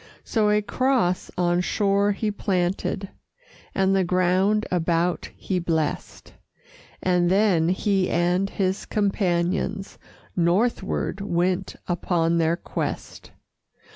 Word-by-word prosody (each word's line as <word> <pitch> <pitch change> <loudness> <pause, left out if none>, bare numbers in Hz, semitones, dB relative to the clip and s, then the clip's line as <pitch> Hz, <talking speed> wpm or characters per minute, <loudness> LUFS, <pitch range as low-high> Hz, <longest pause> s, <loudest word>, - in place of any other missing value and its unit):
So 215 -2 +1
a 210 0 +2
cross 245 -7 0
on 175 0 +2
shore 200 +2 +1
he 210 +1 -2
planted, 190 0 -1 0.7
And 195 0 +2
the 190 - +3
ground 185 +4 +2
about 170 0 0
he 185 -2 -2
blessed, 160 -3 -3 0.7
And 180 -1 +2
then 185 -4 +3
he 190 0 +1
and 180 +3 +1
his 190 0 -2
companions 195 -1 -1 0.4
Northward 190 +3 0
went 185 0 -1
upon 170 -1 +1
their 165 +1 +2
quest. - - -5
185 Hz, 105 wpm, -24 LUFS, 175-200 Hz, 0.7 s, the